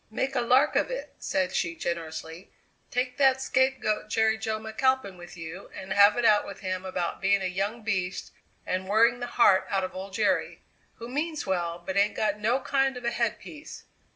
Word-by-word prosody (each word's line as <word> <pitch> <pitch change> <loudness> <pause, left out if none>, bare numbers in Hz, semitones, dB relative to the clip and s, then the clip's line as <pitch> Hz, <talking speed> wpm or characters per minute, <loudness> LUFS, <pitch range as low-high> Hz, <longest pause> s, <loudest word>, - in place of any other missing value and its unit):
"Make 265 +4 -2
a - - +2
lark 255 +5 +3
of - - +2
it," - - -5
said 185 -1 -1
she 170 -1 -1
generously; 165 +1 -5 0.4
"take 250 +1 -2
that 265 -2 +4
scapegoat 260 -5 0
Jerry 220 0 +2
Jo 220 0 -2
McAlpin 220 -1 0
with 175 0 -12
you 165 +3 -8
and 190 0 -5
have 205 +3 +6
it 240 - +1
out 210 -2 +5
with 200 - -9
him 185 -1 -3
about 180 -2 -3
being 200 0 +2
a - - -1
young 200 +5 -2
beast 190 -4 -2 0.3
and 185 +1 -2
worrying 230 +4 +4
the 245 - -4
heart 190 -5 +5
out 195 -1 0
of 185 - -4
old 190 +1 -7
Jerry, - - 0 0.3
who 235 - -8
means 300 +4 -3
well 175 -2 -2
but 190 - -3
ain't 200 +1 +3
got 210 -1 0
no 235 +5 +1
kind 270 -1 +1
of 245 - -8
a 235 - +1
headpiece. 235 +7 -4
210 Hz, 195 wpm, -27 LUFS, 185-245 Hz, 0.4 s, have